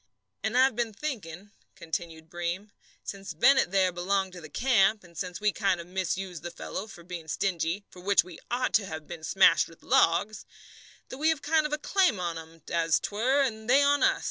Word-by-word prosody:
"And 220 Hz, +3 st, -1 dB
I've 260 Hz, -1 st, +4 dB
been 235 Hz, -2 st, -1 dB
thinking," 200 Hz, -, -6 dB, 0.2 s
continued 160 Hz, -1 st, -5 dB
Breem, 175 Hz, +5 st, -4 dB, 0.3 s
"since 195 Hz, -4 st, -7 dB
Bennett 265 Hz, -, +5 dB
there 190 Hz, -1 st, +2 dB
belonged 190 Hz, +2 st, -1 dB
to 175 Hz, -, -9 dB
the 155 Hz, -, -10 dB
camp, 215 Hz, -, +2 dB
and 170 Hz, -1 st, -18 dB
since 180 Hz, +1 st, -5 dB
we 210 Hz, 0 st, +2 dB
kind 195 Hz, -3 st, 0 dB
of 170 Hz, -, -7 dB
misused 185 Hz, -1 st, -3 dB
the 175 Hz, -, -5 dB
fellow 175 Hz, +4 st, -6 dB
for 175 Hz, -5 st, -12 dB
being 170 Hz, -2 st, -8 dB
stingy 175 Hz, +3 st, -1 dB
for 180 Hz, -, -15 dB
which 200 Hz, +2 st, +3 dB
we 180 Hz, -1 st, -12 dB
ought 250 Hz, +1 st, -1 dB
to 200 Hz, 0 st, +3 dB
have 160 Hz, -2 st, -7 dB
been 170 Hz, -1 st, -9 dB
smashed 170 Hz, 0 st, +4 dB
with 165 Hz, -, -18 dB
logs 200 Hz, +6 st, +2 dB, 0.7 s
that 260 Hz, -, -8 dB
we 310 Hz, +2 st, +3 dB
have 320 Hz, -, +2 dB
a -, -, -18 dB
kind 310 Hz, 0 st, +2 dB
of -, -, -14 dB
a 300 Hz, -, 0 dB
claim 365 Hz, -, +2 dB
on 170 Hz, -2 st, -2 dB
'em, 160 Hz, -1 st, -14 dB
as 165 Hz, -1 st, +2 dB
'twere, 255 Hz, +7 st, +1 dB
and 220 Hz, -3 st, -4 dB
they 275 Hz, +3 st, +6 dB
on 285 Hz, 0 st, +3 dB
us. 390 Hz, 0 st, +3 dB
195 Hz, 210 wpm, -28 LUFS, 170-235 Hz, 0.7 s, they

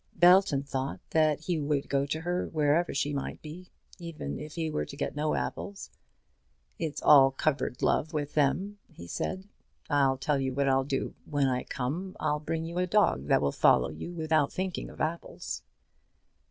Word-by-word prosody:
Belton 175 Hz, -4 st, +5 dB
thought 135 Hz, -1 st, -3 dB
that 155 Hz, -2 st, +3 dB
he 165 Hz, 0 st, -1 dB
would 145 Hz, -1 st, -1 dB
go 140 Hz, 0 st, 0 dB
to 155 Hz, +3 st, -2 dB
her, 175 Hz, +2 st, -1 dB
wherever 155 Hz, +2 st, +1 dB
she 145 Hz, +1 st, -1 dB
might 140 Hz, -, -4 dB
be, 170 Hz, +4 st, -9 dB, 0.3 s
even 165 Hz, -, -6 dB
if 150 Hz, +1 st, -8 dB
he 165 Hz, -2 st, -1 dB
were 150 Hz, -, -1 dB
to -, -, -8 dB
get -, -, -3 dB
no 150 Hz, +1 st, 0 dB
apples. 200 Hz, -1 st, -5 dB, 0.9 s
"It's 155 Hz, -3 st, -3 dB
all 135 Hz, -2 st, +8 dB
cupboard 135 Hz, -2 st, -1 dB
love 155 Hz, -, +2 dB
with 145 Hz, -2 st, -3 dB
them," 185 Hz, +8 st, +1 dB
he 85 Hz, -, -11 dB
said. 185 Hz, -, -4 dB, 0.4 s
"I'll 135 Hz, -2 st, +3 dB
tell 140 Hz, +1 st, 0 dB
you 130 Hz, -1 st, -2 dB
what 140 Hz, 0 st, +1 dB
I'll 135 Hz, 0 st, +3 dB
do; 135 Hz, -1 st, -2 dB
when 145 Hz, -2 st, 0 dB
I 125 Hz, -1 st, -1 dB
come, 155 Hz, +9 st, -4 dB
I'll 150 Hz, 0 st, 0 dB
bring 160 Hz, +2 st, -3 dB
you 170 Hz, +2 st, -4 dB
a 180 Hz, -, +1 dB
dog 180 Hz, -, +2 dB
that -, -, +3 dB
will 70 Hz, -, +2 dB
follow -, -, +4 dB
you 80 Hz, -, -7 dB
without 155 Hz, -3 st, +1 dB
thinking 185 Hz, -1 st, -3 dB
of -, -, -13 dB
apples." 165 Hz, +2 st, -3 dB
150 Hz, 180 wpm, -29 LUFS, 140-170 Hz, 0.9 s, all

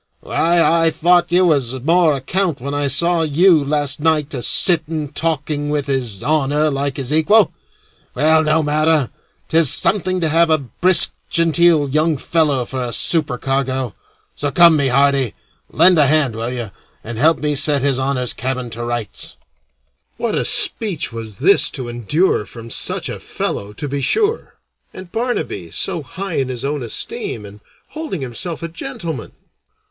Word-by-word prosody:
Why, 170 Hz, +1 st, +1 dB
I 165 Hz, 0 st, +3 dB
thought 175 Hz, +2 st, +2 dB
you 180 Hz, +1 st, +3 dB
was 135 Hz, -6 st, 0 dB
more 165 Hz, +2 st, +3 dB
account 165 Hz, +4 st, -2 dB
when 140 Hz, +3 st, -5 dB
I 145 Hz, 0 st, -1 dB
saw 170 Hz, +5 st, +2 dB
you 160 Hz, +1 st, +3 dB
last 145 Hz, -1 st, -1 dB
night 155 Hz, -1 st, 0 dB
a 130 Hz, -, -4 dB
sitting 160 Hz, -1 st, +2 dB
talking 150 Hz, -1 st, -2 dB
with 145 Hz, -2 st, -1 dB
His 125 Hz, -8 st, -3 dB
Honor 150 Hz, 0 st, +1 dB
like 140 Hz, -1 st, -3 dB
his 135 Hz, +1 st, -3 dB
equal. 200 Hz, +7 st, +3 dB, 0.6 s
Well, 155 Hz, +4 st, +3 dB
no 155 Hz, +1 st, +1 dB
matter; 150 Hz, -2 st, +1 dB, 0.4 s
'tis 160 Hz, -4 st, +4 dB
something 185 Hz, -2 st, 0 dB
to 165 Hz, -, 0 dB
have 165 Hz, +2 st, +2 dB
a 160 Hz, -, +4 dB
brisk, 170 Hz, +6 st, +4 dB, 0.2 s
genteel 165 Hz, -2 st, +2 dB
young 155 Hz, +2 st, 0 dB
fellow 145 Hz, -4 st, 0 dB
for 130 Hz, +2 st, -5 dB
a 120 Hz, -1 st, -4 dB
supercargo. 135 Hz, -, +1 dB, 0.4 s
So 145 Hz, -, -3 dB
come, 170 Hz, +3 st, +6 dB
my 140 Hz, -2 st, +1 dB
hearty, 135 Hz, -2 st, +2 dB, 0.3 s
lend 180 Hz, -3 st, +4 dB
a 145 Hz, -, +5 dB
hand, 145 Hz, -5 st, +2 dB
will 115 Hz, +1 st, -3 dB
you, 120 Hz, -5 st, -5 dB, 0.3 s
and 115 Hz, 0 st, -7 dB
help 160 Hz, +4 st, +4 dB
me 150 Hz, -1 st, -2 dB
set 145 Hz, -1 st, +4 dB
His 135 Hz, -2 st, +1 dB
Honor's 130 Hz, -2 st, -1 dB
cabin 130 Hz, 0 st, -4 dB
to 115 Hz, +1 st, -6 dB
rights." 120 Hz, -3 st, -4 dB, 0.8 s
What -, -, -2 dB
a -, -, -1 dB
speech 190 Hz, -, +1 dB
was 110 Hz, -3 st, -8 dB
this 185 Hz, +10 st, +4 dB
to 125 Hz, -3 st, -6 dB
endure 120 Hz, -, -1 dB
from 115 Hz, -1 st, -11 dB
such -, -, -2 dB
a -, -, -6 dB
fellow, 100 Hz, +1 st, -5 dB
to 145 Hz, +7 st, -6 dB
be 140 Hz, 0 st, -4 dB
sure! 440 Hz, -, -1 dB, 0.4 s
and 185 Hz, -2 st, -11 dB
Barnaby 230 Hz, -, -3 dB
so 170 Hz, -, -3 dB
high 180 Hz, +6 st, -6 dB
in 135 Hz, -1 st, -1 dB
his 125 Hz, 0 st, -5 dB
own 145 Hz, 0 st, -3 dB
esteem, 110 Hz, -2 st, -4 dB
and 100 Hz, +1 st, -13 dB, 0.3 s
holding 310 Hz, -, -6 dB
himself 145 Hz, +7 st, -5 dB
a -, -, -2 dB
gentleman! 160 Hz, -4 st, -7 dB
145 Hz, 165 wpm, -18 LUFS, 130-165 Hz, 0.8 s, come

